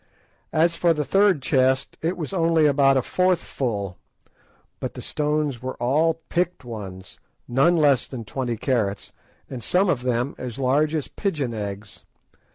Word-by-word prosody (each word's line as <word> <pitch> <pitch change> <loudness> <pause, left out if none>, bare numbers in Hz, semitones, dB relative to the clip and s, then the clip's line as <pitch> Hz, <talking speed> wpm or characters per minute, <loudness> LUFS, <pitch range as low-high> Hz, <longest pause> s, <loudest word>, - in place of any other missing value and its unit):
As 165 +2 +3
for 170 -1 +2
the 150 -1 -1
third 195 -6 +3
chest, 130 -1 +2
it 170 +3 -1
was 170 +2 -5
only 165 -3 +3
about 135 -2 +4
a 130 - +1
fourth 185 -1 +1
full, 100 - -3 0.8
but - - -5
the - - -6
stones 150 -4 -1
were 130 0 -4
all 150 +7 +2
picked 175 -5 -1
ones; 95 -5 -8 0.3
none 140 +8 +3
less 145 -5 +3
than 120 -4 -7
twenty 120 0 -3
carats, 110 -5 -1 0.4
and 125 -4 -7
some 180 - +2
of 125 - -1
them 125 +2 -1
as 125 -3 -6
large 145 +4 +2
as 150 - -2
pigeon 150 - -2
eggs. 100 -1 -6
135 Hz, 160 wpm, -24 LUFS, 120-160 Hz, 0.8 s, about